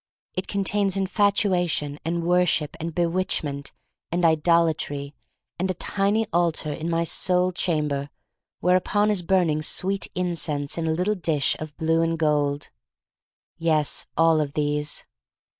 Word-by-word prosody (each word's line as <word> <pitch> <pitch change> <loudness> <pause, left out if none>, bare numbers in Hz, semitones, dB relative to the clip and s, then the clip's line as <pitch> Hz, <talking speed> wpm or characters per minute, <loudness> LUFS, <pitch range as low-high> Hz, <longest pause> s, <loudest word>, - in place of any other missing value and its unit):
It 185 - -4
contains 200 0 0
infatuation, 190 -7 +1
and 170 +1 -2
worship, 175 -3 +2
and 165 0 -5
bewitchment, 165 -5 -1 0.4
and 175 +1 +1
idol 165 +1 +4
atry, 145 -2 -4 0.5
and 185 +2 0
a 185 - -1
tiny 205 +5 0
altar 165 -3 0
in 160 +3 -4
my 165 0 +1
soul 180 +2 +1
cham 160 -4 0
ber 140 0 -3 0.5
whereon 185 +4 +2
is 200 -4 0
burning 170 -4 +1
sweet 190 +5 -1
incense 165 -5 0
in 165 - -1
a - - +1
little 180 +6 +1
dish 160 -7 0
of 155 -1 -8
blue 160 +1 +2
and 165 0 0
gold. 145 -2 0 0.9
"Yes, 155 -3 +2
all 165 -1 +4
of 145 -2 -3
these. 150 0 -2
165 Hz, 140 wpm, -24 LUFS, 150-185 Hz, 0.9 s, idol